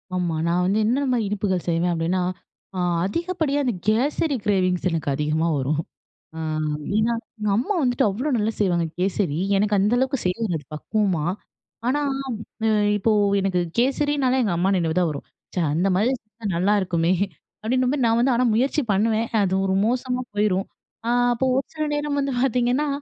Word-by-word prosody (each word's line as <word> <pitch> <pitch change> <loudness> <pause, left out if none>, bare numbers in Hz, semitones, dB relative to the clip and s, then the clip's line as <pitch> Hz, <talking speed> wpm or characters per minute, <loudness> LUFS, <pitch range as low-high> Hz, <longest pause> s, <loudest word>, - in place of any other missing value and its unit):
ஆமா, 175 -3 -1
நான் 175 +1 +2
வந்து 200 +3 +2
என்னென்ன 255 +1 +1
இனிப்புகள் 195 -3 -1
செய்வேன்? 170 +1 +1
அப்பிடின்னா, 170 +3 0 0.6
அ - - -1 0.3
அதிகப்படியான 315 - -1
அந்த 245 - +1
கேசரி 275 +6 +1
கிரேவிங்ஸ் 185 -3 +1
எனக்கு 160 -3 -2
அதிகமா 155 +3 0
வரும். 145 +4 0 0.5
அ, - - -6 0.6
ஏன்னா 225 +2 +2 0.3
எங்க 210 -1 -1
அம்மா 255 - 0
வந்துட்டு, 245 -3 +2
அவ்ளோ 245 +10 -2
நல்லா 220 +1 0
செய்வாங்க 175 -5 +2
கேசரி. 185 -4 0 0.2
எனக்கு 210 +1 +2
அந்த 205 +4 +2
அளவுக்கு 265 0 0
செய்ய 180 0 0
வராது 165 -8 -3
பக்குவமா. 185 -2 0 0.6
ஆனா 290 +4 +1 0.6
அ, - - +3 0.3
இப்போ 215 +2 +1 0.3
எனக்கு 190 -2 0 0.2
கேசரினாலே 270 0 +2
எங்க 200 -6 0
அம்மா 185 +3 +2
நினைவுதான் 170 0 +1
வரும். 140 - -7 0.3
ச்சே! 180 - 0
அந்தமாரி 190 +8 +2
செஞ்சா 215 +1 -15
நல்லாருக்குமே 180 -2 +2 0.5
அப்பிடின்னும்மே 255 +4 +1
நான் 225 0 +3
வந்து 255 +2 +3
ஆனா 245 - +2
முயற்சி 265 +6 +2
பண்ணுவேன். 220 +3 +1
அது 190 -2 +1
ஒரு 190 - +1
மோசமா 250 +2 -1
போயிரும். 205 -2 +1 0.4
அ, - - +1 0.2
அப்போ 250 +3 -1
ஒரு 270 - 0
சில 310 - -1
நேரம் 295 -1 -1
வந்து 275 -1 -1
பாத்தீங்கன்னா, 250 +3 +1
210 Hz, 155 wpm, -23 LUFS, 180-255 Hz, 0.6 s, அ